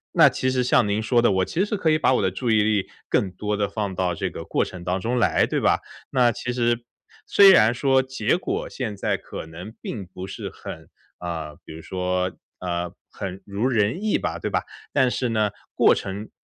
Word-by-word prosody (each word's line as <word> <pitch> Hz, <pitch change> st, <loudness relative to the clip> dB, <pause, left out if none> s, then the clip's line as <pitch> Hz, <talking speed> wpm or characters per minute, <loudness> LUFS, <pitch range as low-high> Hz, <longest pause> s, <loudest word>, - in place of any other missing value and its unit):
那 155 Hz, -5 st, +8 dB
其 130 Hz, -1 st, -1 dB
实 130 Hz, -1 st, +1 dB
像 120 Hz, -4 st, +3 dB
您 100 Hz, +2 st, 0 dB
说 120 Hz, +2 st, +3 dB
的， 120 Hz, -, +4 dB
我 95 Hz, -1 st, +2 dB
其 185 Hz, +4 st, 0 dB
实 210 Hz, -, -2 dB
可 170 Hz, -5 st, +1 dB
以 155 Hz, -, +4 dB
把 150 Hz, -, +3 dB
我 125 Hz, -, +2 dB
的 95 Hz, -, +2 dB
注 115 Hz, +6 st, -3 dB
意 110 Hz, -1 st, +5 dB
力 105 Hz, -2 st, +1 dB, 0.2 s
更 95 Hz, -, +2 dB
多 105 Hz, +3 st, -2 dB
的 100 Hz, -, +1 dB
放 100 Hz, -1 st, -3 dB
到 90 Hz, -1 st, 0 dB
这 -, -, -2 dB
个 -, -, -7 dB
过 -, -, +1 dB
程 90 Hz, -2 st, -8 dB
当 90 Hz, +1 st, -1 dB
中 120 Hz, +5 st, 0 dB
来， 120 Hz, -, +3 dB
对 -, -, 0 dB
吧？ -, -, +3 dB, 0.3 s
那 125 Hz, -3 st, +4 dB
其 120 Hz, +1 st, -4 dB
实 120 Hz, -1 st, 0 dB, 0.4 s
虽 200 Hz, -1 st, +8 dB
然 115 Hz, -, +6 dB
说 135 Hz, +1 st, +3 dB
结 130 Hz, +2 st, 0 dB
果 -, -, -3 dB
现 110 Hz, -6 st, -4 dB
在 -, -, 0 dB
可 -, -, -8 dB
能 90 Hz, +7 st, -9 dB
并 100 Hz, -5 st, -5 dB
不 90 Hz, +1 st, -8 dB
是 -, -, -6 dB
很， -, -, -9 dB, 0.3 s
呃， 80 Hz, -4 st, -5 dB
比 80 Hz, -, -9 dB
如 80 Hz, -, -9 dB
说 90 Hz, +1 st, -1 dB, 0.3 s
呃， 90 Hz, -1 st, -3 dB, 0.2 s
很 95 Hz, -2 st, -6 dB
如 100 Hz, +5 st, -1 dB
人 115 Hz, -, +1 dB
意 215 Hz, -, +2 dB
吧， 85 Hz, -1 st, -2 dB
对 -, -, -2 dB
吧？ -, -, +1 dB, 0.3 s
但 130 Hz, -3 st, +4 dB
是 125 Hz, -, -1 dB
呢， 110 Hz, -2 st, +2 dB, 0.2 s
过 -, -, +5 dB
程 100 Hz, +3 st, -5 dB
105 Hz, 235 characters per minute, -24 LUFS, 95-125 Hz, 0.4 s, 那